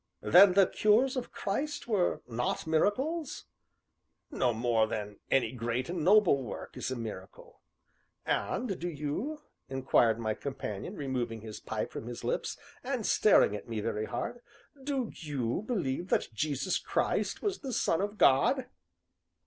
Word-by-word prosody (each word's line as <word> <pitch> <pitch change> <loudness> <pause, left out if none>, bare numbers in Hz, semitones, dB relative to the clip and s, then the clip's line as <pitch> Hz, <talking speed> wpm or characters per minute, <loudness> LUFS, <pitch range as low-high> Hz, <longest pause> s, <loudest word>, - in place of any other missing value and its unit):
"Then 180 - +8
the 195 0 +6
cures 225 +8 +3
of 250 -2 -4
Christ 235 +7 -3
were 200 -6 +1
not 120 0 -2
miracles?" 265 - 0 0.9
"No 130 - +1
more 115 -1 +2
so - - -9
than 105 -1 -4
any 135 - +2
great 120 +1 -2
and 175 -3 -2
noble 185 -6 +5
work 125 - -7
is - - -3
a 130 - -2
miracle." 110 -5 -8 0.6
"And 220 -7 -1
do 175 - -2
you," 170 - -4 0.3
inquired 130 -4 +3
my 110 -2 -1
companion, 135 - -5
removing 125 - -3
his 110 -1 -8
pipe - - -4
from 115 - -7
his 120 -1 -7
lips, - - -2 0.3
and - - -2
staring 105 - +5
at 105 - -8
me 115 -2 -2
very 105 +1 -2
hard, 240 - -4 0.4
"do 265 -5 -2
you 145 - -3
believe 175 - -1
that 115 - 0
Jesus 150 - -1
Christ - - -1
was 400 -2 -1
the 270 - -5
Son 175 -6 +1
of 205 +1 -3
God?" 245 - +4
150 Hz, 150 wpm, -30 LUFS, -, 0.9 s, Then